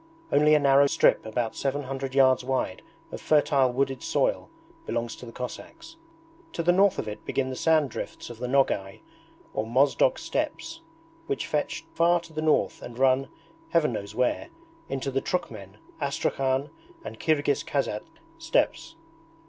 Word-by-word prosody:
Only 150 Hz, +1 st, +5 dB
a -, -, +5 dB
narrow 140 Hz, 0 st, +5 dB
strip -, -, +3 dB
about 115 Hz, 0 st, -2 dB
seven 140 Hz, +1 st, -2 dB
hundred 135 Hz, 0 st, -5 dB
yards 130 Hz, -2 st, +5 dB
wide 130 Hz, -8 st, -2 dB, 0.3 s
of -, -, -7 dB
fertile 140 Hz, -4 st, +3 dB
wooded 135 Hz, +1 st, -1 dB
soil -, -, 0 dB, 0.4 s
belongs 115 Hz, -1 st, -2 dB
to 125 Hz, -, -10 dB
the -, -, -8 dB
Cossacks. 330 Hz, -, -8 dB, 0.6 s
To 170 Hz, -, -2 dB
the 175 Hz, -, +4 dB
north 195 Hz, +2 st, +4 dB
of -, -, -3 dB
it 105 Hz, -, -7 dB
begin 130 Hz, -1 st, -1 dB
the -, -, -4 dB
sand 155 Hz, -2 st, +2 dB
drifts -, -, -6 dB
of 115 Hz, -, -11 dB
the 125 Hz, -, -3 dB
Nogay 125 Hz, -7 st, +1 dB, 0.5 s
or 110 Hz, -, -2 dB
Mozdok 140 Hz, -, +3 dB
steppes, 330 Hz, 0 st, -3 dB, 0.5 s
which 415 Hz, -, -2 dB
fetch 150 Hz, +2 st, -2 dB
far 170 Hz, +1 st, +3 dB
to 165 Hz, -1 st, -15 dB
the 155 Hz, -, -3 dB
north 155 Hz, -1 st, +1 dB
and 120 Hz, -1 st, -9 dB
run, 135 Hz, +1 st, +3 dB, 0.4 s
Heaven 155 Hz, -7 st, +2 dB
knows 100 Hz, 0 st, -6 dB
where, 125 Hz, 0 st, 0 dB, 0.4 s
into 135 Hz, 0 st, -3 dB
the 135 Hz, +1 st, 0 dB
Trukhmen, 105 Hz, -, -4 dB, 0.2 s
Astrakhan, 135 Hz, 0 st, -1 dB, 0.3 s
and -, -, -8 dB
Kirghiz 145 Hz, -3 st, +1 dB
Kaisatsk 135 Hz, -2 st, -2 dB, 0.3 s
steppes. 330 Hz, 0 st, 0 dB
135 Hz, 155 wpm, -26 LUFS, 125-155 Hz, 0.6 s, Only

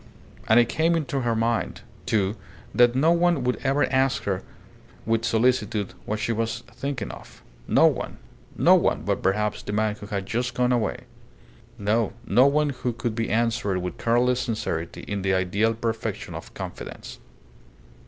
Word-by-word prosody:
And 110 Hz, +2 st, +6 dB
it 120 Hz, -, +4 dB
came 165 Hz, +5 st, +2 dB
into 140 Hz, -4 st, -1 dB
her 120 Hz, -2 st, 0 dB
mind, 115 Hz, +1 st, -1 dB, 0.3 s
too, 105 Hz, -1 st, +1 dB, 0.4 s
that 120 Hz, 0 st, +5 dB
no 155 Hz, +5 st, +4 dB
one 170 Hz, -4 st, +3 dB
would 125 Hz, 0 st, 0 dB
ever 140 Hz, +1 st, +1 dB
ask 130 Hz, 0 st, +2 dB
her 95 Hz, -2 st, -1 dB, 0.6 s
with 115 Hz, 0 st, +1 dB
solicitude 110 Hz, -4 st, +1 dB
what 110 Hz, -, -2 dB
she 110 Hz, -, -1 dB
was 115 Hz, +1 st, -2 dB
thinking 135 Hz, -7 st, -5 dB
of. -, -, -13 dB, 0.2 s
No -, -, +5 dB
one. -, -, 0 dB, 0.4 s
No -, -, +6 dB
one, -, -, +2 dB
but -, -, -1 dB
perhaps 105 Hz, +2 st, 0 dB
the 105 Hz, -, -5 dB
man 110 Hz, 0 st, +1 dB
who 105 Hz, -1 st, -10 dB
had 100 Hz, -3 st, -3 dB
just 120 Hz, +4 st, -2 dB
gone 125 Hz, 0 st, +2 dB
away. 120 Hz, -3 st, 0 dB, 0.8 s
No; 105 Hz, +1 st, +1 dB
no 125 Hz, +7 st, +5 dB
one 150 Hz, +1 st, +2 dB
who 125 Hz, -2 st, -3 dB
could 115 Hz, 0 st, -3 dB
be 115 Hz, 0 st, -2 dB
answered 110 Hz, -3 st, +1 dB
with 90 Hz, -1 st, -5 dB
careless 120 Hz, +2 st, +2 dB
sincerity 110 Hz, -9 st, -3 dB
in 100 Hz, -1 st, -2 dB
the 95 Hz, 0 st, +1 dB
ideal 100 Hz, +5 st, +1 dB
perfection 115 Hz, 0 st, -3 dB
of -, -, -8 dB
confidence. -, -, -8 dB
115 Hz, 165 wpm, -25 LUFS, 105-125 Hz, 0.8 s, And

